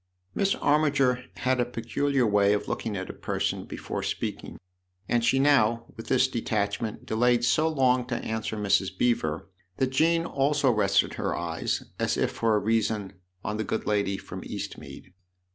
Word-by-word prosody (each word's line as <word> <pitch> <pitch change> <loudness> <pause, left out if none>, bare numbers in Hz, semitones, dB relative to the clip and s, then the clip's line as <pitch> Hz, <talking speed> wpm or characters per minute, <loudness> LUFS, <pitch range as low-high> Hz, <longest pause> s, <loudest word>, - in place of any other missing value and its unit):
Miss 195 0 +1
Armiger 140 -4 +2
had 130 0 0
a - - +4
peculiar 125 +3 0
way 100 -1 +4
of 105 - -2
looking 105 -3 -3
at 95 - -4
a - - -13
person - - -2
before - - -5
speaking, - - -4 0.5
and 120 -1 +1
she 120 +3 +3
now, 115 -5 +3
with 115 - -9
this 130 -1 +3
detachment, 110 -3 -2
delayed 120 +1 +2
so 155 +6 +3
long 130 -5 +2
to 125 - -2
answer 110 -1 -3
Mrs. 100 -2 +1
Beever 80 -11 0 0.3
that 130 -1 0
Jean 165 +4 +2
also 140 -2 +2
rested 100 -3 +2
her - - -2
eyes, 85 -1 -2 0.2
as - - 0
if - - +1
for 115 -1 +1
a - - +3
reason, 105 -2 0 0.3
on 105 +1 -2
the 110 - -1
good 110 - -3
lady 100 -2 0
from - - -8
Eastmead. 90 - -8
115 Hz, 165 wpm, -27 LUFS, 105-130 Hz, 0.5 s, a